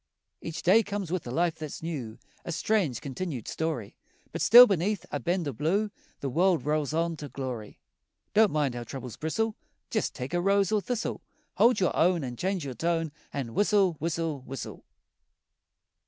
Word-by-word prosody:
Each 165 +2 -6
day 200 +6 +6
comes 200 -4 -4
with 180 -7 -2
a - - -4
life 165 +3 0
that's 155 0 -6
new, 130 -10 -4 0.3
A - - -5
strange, 170 - 0
continued 140 - -5
story 155 -10 -3 0.4
But - - -4
still 240 +3 +10
beneath 195 -1 0
a 145 - -1
bend 175 +5 -1
o' 140 - -2
blue 195 - 0 0.3
The 140 - -2
world 175 +2 +2
rolls 150 -1 0
on 165 +1 0
to 145 -1 -7
glory. 125 -6 -6 0.6
Don't 215 0 +6
mind 145 -5 0
how 120 0 -5
troubles 125 0 -7
bristle, 220 +8 -1 0.4
Jest 220 - -1
take 130 +4 -5
a 175 - +2
rose 195 +1 +3
or 215 -1 +2
thistle. 240 +2 -3 0.4
Hold 235 -1 +5
your 185 - +1
own 175 -2 +3
An' 125 -2 -4
change 185 +3 -2
your 135 - -4
tone 165 +4 -1 0.2
An' 125 -5 -4
whistle, 200 - +3
whistle, 160 -2 -2
whistle! 130 0 -8
165 Hz, 175 wpm, -28 LUFS, 140-195 Hz, 0.6 s, still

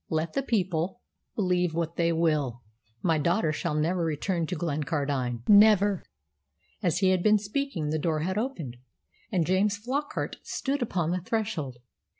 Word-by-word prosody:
"Let 160 0 -1
the - - +1
people 190 -5 -1 0.4
believe 180 -4 +1
what 165 0 -2
they 170 0 +2
will. 150 -8 0 0.4
My 165 -3 +2
daughter 170 +2 +2
shall 155 0 -2
never 170 +4 +1
return 165 +2 -1
to 180 - -3
Glencardine 145 -6 -2
never!" 205 -2 +6 0.8
As 175 -6 +1
he 190 -1 +3
had 185 -1 +2
been 215 +3 +5
speaking 205 - -2
the 155 - 0
door 155 0 0
had 185 +4 -1
opened, 185 - -3 0.5
and 180 -6 +2
James 200 +3 +2
Flockart 265 +7 -3
stood 280 0 -2
upon 175 -8 0
the 180 0 -1
threshold. 175 - -2
175 Hz, 155 wpm, -28 LUFS, 155-205 Hz, 0.8 s, never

